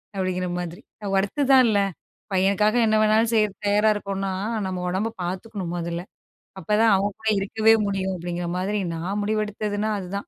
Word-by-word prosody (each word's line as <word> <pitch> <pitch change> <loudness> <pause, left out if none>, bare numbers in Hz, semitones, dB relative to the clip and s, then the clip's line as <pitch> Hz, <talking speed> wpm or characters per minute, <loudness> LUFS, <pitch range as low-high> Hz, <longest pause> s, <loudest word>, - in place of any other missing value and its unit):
அப்படிங்கிற 185 -1 -1
மாதிரி. 175 +2 -6 0.4
ஒர்த்து 200 +9 0
தான் 255 -2 +7
இல்லை 205 -2 +3 0.5
பையனுக்காக 200 +3 +2
என்ன 215 0 +2
வேணாலும் 220 +1 +3
செய்ய 215 -1 +4 0.2
தயாரா 210 +2 +3
இருக்கோம்னா, 195 -1 -3 0.4
நம்ம 185 -1 -3
ஒடம்பை 200 +5 -1
பார்த்துக்கணும் 185 0 -4
மொதல்ல. 170 0 -3 0.6
அப்பதான் 215 +2 +3
அவங்க 200 +2 0
கூட 220 0 -1
இருக்கவே 220 +3 +3
முடியும் 190 -1 -1
அப்படிங்கிற 175 0 -4
மாதிரி 200 +2 -1
நான் 185 +5 -3
முடிவெடுத்ததுனா 215 0 -1
அதுதான். 185 +1 -8
200 Hz, 145 wpm, -24 LUFS, 185-215 Hz, 0.6 s, தான்